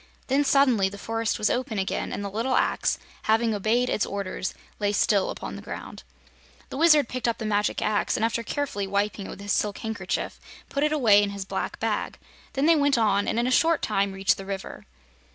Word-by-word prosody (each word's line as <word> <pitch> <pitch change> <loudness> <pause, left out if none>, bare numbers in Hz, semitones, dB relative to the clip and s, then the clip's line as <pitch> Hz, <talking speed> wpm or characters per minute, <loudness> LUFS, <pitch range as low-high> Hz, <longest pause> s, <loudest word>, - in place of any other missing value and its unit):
Then, 275 +2 +3
suddenly, 260 -9 +3
the 200 - -9
forest 225 +1 -2
was 210 - +1
open 245 -3 -2
again, 190 0 -2
and 205 - -4
the 200 - -4
little 230 +5 0
axe, - - +1 0.3
having 225 +1 +3
obeyed 220 +5 +1
its 215 - 0
orders, 195 -1 -4 0.2
lay 205 -1 0
still 200 -1 +2
upon - - -6
the - - -8
ground. - - -8 0.7
The - - -6
Wizard 305 -4 +5
picked 255 0 -3
up 230 - 0
the 220 - -5
magic 210 -1 0
axe 210 -1 +1
and 220 - +1
after 230 +1 -1
carefully 230 -5 -3
wiping 200 0 -1
it - - -9
with 200 - -9
his 205 0 -1
silk 205 -2 0
handkerchief 220 0 -3 0.3
put 280 - -2
it 300 - +2
away 225 -9 +5
in 205 - 0
his 200 -1 -5
black - - -4
bag. - - -2 0.4
Then 275 +2 +1
they 330 +1 +6
went 285 -2 +3
on 205 -3 +2
and - - 0
in 235 - +2
a 255 - 0
short 325 +4 +3
time 200 -2 +1
reached 195 0 +1
the 195 - -8
river. 195 -1 -6
220 Hz, 215 wpm, -26 LUFS, 200-255 Hz, 0.7 s, they